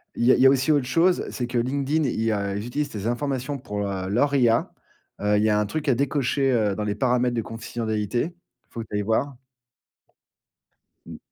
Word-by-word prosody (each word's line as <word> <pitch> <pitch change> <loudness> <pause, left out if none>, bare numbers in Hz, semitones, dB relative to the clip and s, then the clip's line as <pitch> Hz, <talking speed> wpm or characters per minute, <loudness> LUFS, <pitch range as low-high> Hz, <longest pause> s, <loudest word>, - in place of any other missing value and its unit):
Il 120 - 0
y 130 - +6
a - - +6
il 125 - +1
y - - +6
a - - +8
aussi 135 +3 +2
autre 145 -4 +2
chose, 170 +6 +2
c'est 120 -2 -3
que 125 0 -2
LinkedIn, 140 +5 0
il 120 - -1
y 115 0 +1
a 100 -1 -1
ils 105 +2 -4
utilisent 145 +3 -2
des 105 -2 -5
informations 135 +2 -2
pour, 105 -5 -4
heu, 95 -1 -3
leur 140 +7 +2
IA. 120 -3 +2 0.5
Il 105 0 +2
y 110 - +3
a 105 0 +3
un 105 - +1
truc 150 +8 -4
à 125 - +4
décocher, 135 0 +1
heu, 105 -5 +1
dans 105 - -3
les 105 -1 -2
paramètres 125 -1 +1
de 115 - 0
confidentialité. 115 - -3 0.3
Il - - -46
faut 115 - -5
que 110 - -9
tu 105 - -5
ailles 105 - +1
voir. 125 +6 0 1.7
Mmh. - - -9
120 Hz, 230 wpm, -24 LUFS, 105-140 Hz, 1.7 s, a